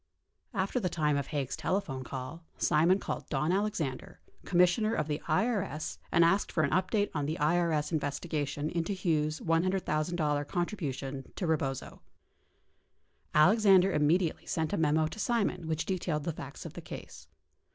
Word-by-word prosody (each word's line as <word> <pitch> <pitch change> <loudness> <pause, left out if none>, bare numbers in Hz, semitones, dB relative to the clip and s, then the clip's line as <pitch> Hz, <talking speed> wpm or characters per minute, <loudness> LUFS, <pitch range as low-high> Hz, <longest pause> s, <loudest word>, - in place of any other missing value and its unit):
After 195 +6 0
the 185 -6 -1
time 150 -3 +1
of 140 -1 -1
Haig's 140 -4 -2
telephone 155 -5 -2
call, 130 +6 -7
Simon 165 +5 +4
called - - -5
Don 150 +3 0
Alexander, 190 -9 -2 0.3
Com 175 - -1
missioner 215 +5 +4
of 150 - -1
the 150 0 -2
IES 200 -10 0
and 170 -1 +5
asked 195 +4 +2
for 155 - +1
an 140 - +1
update 190 +4 +1
on 145 -2 -1
the 155 - -2
IES 155 0 +1
investiga 150 0 -1
tion 145 +2 -3
into 170 +3 -1
the 190 - -7
Hughes 155 -3 0
$100,000 165 -3 0
contribution 140 - -3
to 185 - -2
Eebozo. 140 -5 -2 1.4
Alexander 195 +3 +6
im 150 -3 +2
mediately 170 +1 +1
sent 160 -1 -1
a - - +1
memo 155 0 +3
to 155 +7 -6
Simon 215 -8 0
which 160 0 -1
detailed 170 -5 -1
the 165 - -2
facts 140 -2 -9
of - - -7
the - - -8
case. - - -10
160 Hz, 160 wpm, -30 LUFS, 150-185 Hz, 1.4 s, Alexander